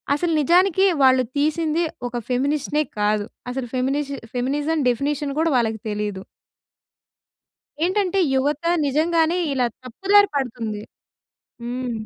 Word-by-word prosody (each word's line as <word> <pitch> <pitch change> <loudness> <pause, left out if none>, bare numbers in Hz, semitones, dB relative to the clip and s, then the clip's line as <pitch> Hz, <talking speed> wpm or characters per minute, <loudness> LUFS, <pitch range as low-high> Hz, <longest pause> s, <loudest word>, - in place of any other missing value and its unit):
అసలు 335 +3 -1
నిజానికి 365 +5 +4 0.2
వాళ్ళు 260 -1 +5
తీసింది 310 +2 +1 0.3
ఒక 240 - -9
ఫెమినిస్ట్‌నే 285 +4 0 0.2
కాదు. 210 0 +1 0.3
అసలు 255 -1 -4
ఫెమినిష్ 275 +3 -1 0.2
ఫెమినిజం 290 +6 -1
డెఫినిషన్ 280 +3 -1
కూడా 325 +1 +2
వాళ్ళకి 225 -2 0
తెలీదు. 205 -2 -3 1.6
ఏంటంటే 380 +1 +1 0.2
యువత 285 +4 0 0.2
నిజంగానే 325 +4 +2 0.2
ఇలా 250 -2 +1 0.2
తప్పుదారి 395 - +3
పడుతుంది. 230 -6 -3 0.8
హ్మ్. 245 +1 -3
280 Hz, 105 wpm, -22 LUFS, 245-320 Hz, 1.6 s, వాళ్ళు